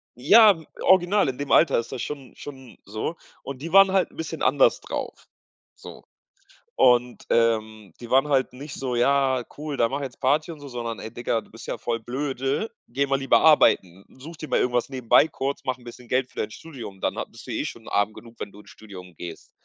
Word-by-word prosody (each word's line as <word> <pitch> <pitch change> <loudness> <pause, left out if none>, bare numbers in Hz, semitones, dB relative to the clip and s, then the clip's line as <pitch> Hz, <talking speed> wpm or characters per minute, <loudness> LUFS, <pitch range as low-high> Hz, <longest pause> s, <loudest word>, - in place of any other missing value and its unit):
ja, 205 - +6
w 160 - -15 0.2
original 190 -1 +4
in 130 - -5
dem 145 0 -5
Alter 155 -7 +5
ist 115 - -6
das 120 - -5
schon 140 -4 -7
schon 130 -4 -11
so. 110 +10 -4 0.3
Und 135 -1 -7
die 165 +2 -6
waren 195 -1 +7
halt 190 -1 +1
'n - - -20
bisschen 160 - -5
anders - - +3
drauf. - - -6 0.5
So. - - -12 0.7
Und 125 0 +3
ähm, 110 -3 0
die 120 - -9
waren 135 +3 +4
halt 135 -2 +2
nicht 140 +2 -9
so: 130 -2 -3
„Ja, 130 0 +2
cool, 150 -1 -5
dann 115 - +2
mach 140 +1 -2
jetzt 130 -3 -7
Party“, 150 +5 +1
und 155 - -10
so, 145 - -10
sondern: 120 -2 -5
„Ey 110 - -7
Digger, 115 -1 -1
du - - -21
bist 115 +1 -11
ja - - -3
voll 115 -1 -2
blöde, 135 - -2 0.2
geh 140 +1 0
mal 135 0 +1
lieber 135 - +3
arbeiten. 95 - +4
Such 160 +5 -10
dir 155 - -8
mal - - +2
irgendwas 125 0 0
nebenbei 130 +3 +3
kurz, 140 -1 -4
mach 130 -1 -1
'n 125 - -20
bisschen 120 +1 -11
Geld 130 0 0
für - - -9
dein 110 - -2
Studium, 120 -10 -10
dann - - -1
ha - - -1
bist - - -15
du - - -5
eh - - -2
schon - - -8
arm 105 +1 +1
genug, 115 0 -14
wenn - - -6
du 100 - -15
ins - - -19
Studium 90 -5 -12
gehst." 85 0 -9
130 Hz, 225 wpm, -24 LUFS, 115-145 Hz, 0.7 s, waren